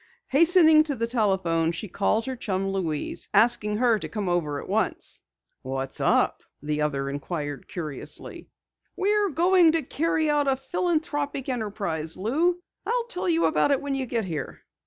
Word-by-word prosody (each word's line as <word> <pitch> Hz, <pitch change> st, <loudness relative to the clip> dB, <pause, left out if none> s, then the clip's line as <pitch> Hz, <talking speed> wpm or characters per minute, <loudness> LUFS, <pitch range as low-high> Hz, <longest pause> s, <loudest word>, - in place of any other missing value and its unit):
Hastening 320 Hz, +1 st, +6 dB
to 290 Hz, -3 st, -2 dB
the 230 Hz, -1 st, -1 dB
telephone 190 Hz, -8 st, +1 dB
she 170 Hz, +5 st, -6 dB
called 210 Hz, +4 st, 0 dB
her 260 Hz, -1 st, -3 dB
chum, 195 Hz, -5 st, -2 dB
Louise, 165 Hz, -6 st, -3 dB
asking 210 Hz, -1 st, +3 dB
her 235 Hz, -2 st, +3 dB
to -, -, -6 dB
come 210 Hz, -4 st, -3 dB
over 160 Hz, -5 st, 0 dB
at -, -, -9 dB
once. -, -, -1 dB, 0.4 s
"What's 135 Hz, 0 st, -4 dB
up?" -, -, +2 dB, 0.2 s
the 150 Hz, +1 st, -2 dB
other 140 Hz, -2 st, -1 dB
inquired 145 Hz, 0 st, -4 dB
curiously. 155 Hz, -6 st, -6 dB, 0.5 s
"We're 410 Hz, +1 st, +2 dB
going 345 Hz, +1 st, +4 dB
to 325 Hz, -2 st, +1 dB
carry 315 Hz, +3 st, 0 dB
out 295 Hz, -1 st, +2 dB
a 270 Hz, -, +3 dB
philanthropic 290 Hz, -2 st, -2 dB
enterprise, 200 Hz, -9 st, -3 dB
Lou! 330 Hz, -, 0 dB, 0.2 s
I'll 480 Hz, 0 st, 0 dB
tell 360 Hz, -5 st, -2 dB
you 330 Hz, 0 st, +3 dB
about 315 Hz, -, +2 dB
it 280 Hz, -2 st, +3 dB
when 285 Hz, -1 st, -3 dB
you 265 Hz, -1 st, -2 dB
get 230 Hz, -3 st, -1 dB
here!" 165 Hz, -5 st, -5 dB
230 Hz, 160 wpm, -26 LUFS, -, 0.5 s, Hastening